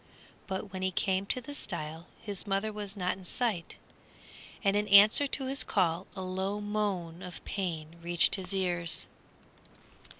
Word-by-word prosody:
But 190 0 -4
when 185 - -4
he 190 - +1
came 190 +1 0
to 255 - +1
the 270 +4 -8
stile 165 - -5
his 205 -1 -6
mother 200 +2 -1
was 205 -1 -6
not 180 -1 -1
in 190 - -13
sight, 195 -2 -1 0.9
and 200 -1 +3
in 210 0 +1
answer 210 +8 +8
to 270 0 -1
his 270 +2 +2
call 180 -2 0
a 190 - -5
low 190 +2 -2
moan 200 -5 -2
of 180 -2 -8
pain 170 -4 -3
reached 175 0 +5
his 185 -3 -1
ears. 175 -3 0
190 Hz, 160 wpm, -30 LUFS, 175-210 Hz, 0.9 s, answer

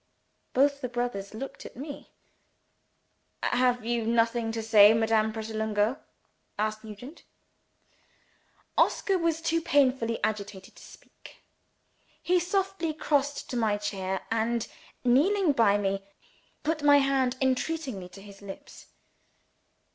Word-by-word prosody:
Both 280 +2 +2
the 250 - -3
brothers 240 -5 -3
looked 270 +5 -7
at - - -11
me. 280 +3 -8 1.3
"Have 245 -2 +1
you 235 0 0
nothing 230 0 +1
to 225 -1 -3
say, 215 -1 +7
Madame 220 -1 +2
Pratolungo?" 220 +2 -1 0.6
asked 215 +1 -2
Nugent. 220 +8 -10 1.6
Oscar 385 -2 +2
was 330 -1 0
too 330 0 +1
painfully 260 -7 +2
agitated 200 -3 -4
to - - -15
speak. - - -16 0.8
He 360 +1 +2
softly 370 -2 -1
crossed 285 -2 0
to - - -3
my 215 -3 +1
chair; 190 -2 -3
and, 230 +1 0 0.4
kneeling 315 +9 +3
by 225 -6 +3
me, 195 -1 -1 0.6
put 310 0 -1
my 290 0 +6
hand 270 -2 +1
entreatingly 260 - -1
to 195 +2 -13
his 200 -1 -14
lips. 195 -1 -11
235 Hz, 115 wpm, -28 LUFS, 215-285 Hz, 1.6 s, say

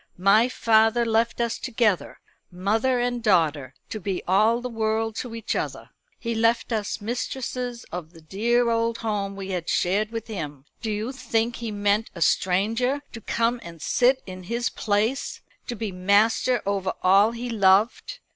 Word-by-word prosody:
My 200 +6 +4
father 225 0 +3
left 230 +1 +1
us 235 -1 -1
together, 225 -6 0 0.3
mother 220 +8 +1
and 245 0 -1
daughter, 155 - +1 0.2
to 215 - -3
be 190 -1 -3
all 215 +6 +4
the 250 - -4
world 225 -1 -1
to 240 -2 -5
each 230 - -3
other. - - -4 0.3
He 235 -1 -3
left 230 +1 +1
us 215 0 -2
mistresses 245 +1 -4
of 170 -2 -6
the 165 -2 -16
dear 235 +8 +1
old 230 0 0
home 200 -2 -2
we 195 -1 -6
had 175 -2 -3
shared 205 +4 +1
with 225 -1 -5
him. 150 - -6 0.2
Do 225 - -3
you 215 +4 -2
think 240 -3 -1
he 235 -1 -4
meant 205 +1 0
a 170 - -8
stranger 225 +9 +1
to 230 - -8
come 235 +3 0
and 170 -1 -10
sit 255 - +2
in 185 -1 -8
his 235 +5 -1
place 215 +5 -1 0.3
to 240 - -3
be 220 -2 -4
master 210 +6 +2
over 195 -1 -1
all 200 +4 +5
he 240 +1 -5
loved? 215 - +2
220 Hz, 165 wpm, -25 LUFS, 195-235 Hz, 0.3 s, all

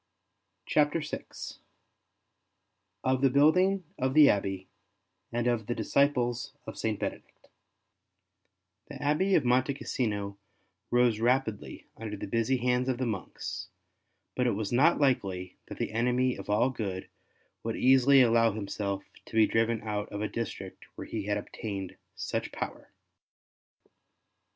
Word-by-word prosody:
CHAPTER 150 +2 +2
VI 150 - -5 1.8
OF 130 0 +1
THE 135 - +5
BUILDING 180 +8 +4 0.2
OF 130 +1 0
THE 150 -2 +8
ABBEY, 95 -2 -2 0.6
AND 120 0 -1
OF 120 -3 0
THE 120 - -1
DISCIPLES 125 -4 +1
OF - - -7
SAINT 110 -2 -2
BENEDICT - - -6 1.4
The - - -9
Abbey 150 +7 +2
of - - +3
Monte 130 +3 +2
Cassino 100 -7 -3 0.5
rose 120 -3 +3
rapidly 120 -2 0
under 110 -2 -5
the - - -5
busy 115 +5 +1
hands 125 +1 +1
of 130 - 0
the 130 - -1
monks, 110 -6 -5 0.7
but 125 -1 +1
it 120 - +2
was 105 -1 -3
not 140 +8 +4
likely 95 -10 0
that - - -8
the - - -2
enemy 125 +3 +1
of - - -9
all 110 +5 +3
good 100 -6 -4 0.5
would 115 0 -3
easily 135 +1 +6
allow 115 -2 +4
himself 100 -1 -3 0.2
to - - -10
be 110 -1 +6
driven 115 0 +1
out 105 -1 -3
of 105 - -5
a - - 0
district 115 0 -6
where - - -7
he 105 -3 -4
had 105 0 +1
obtained 100 -2 -6 0.2
such - - -3
power. - - -6
120 Hz, 140 wpm, -29 LUFS, 105-130 Hz, 1.8 s, THE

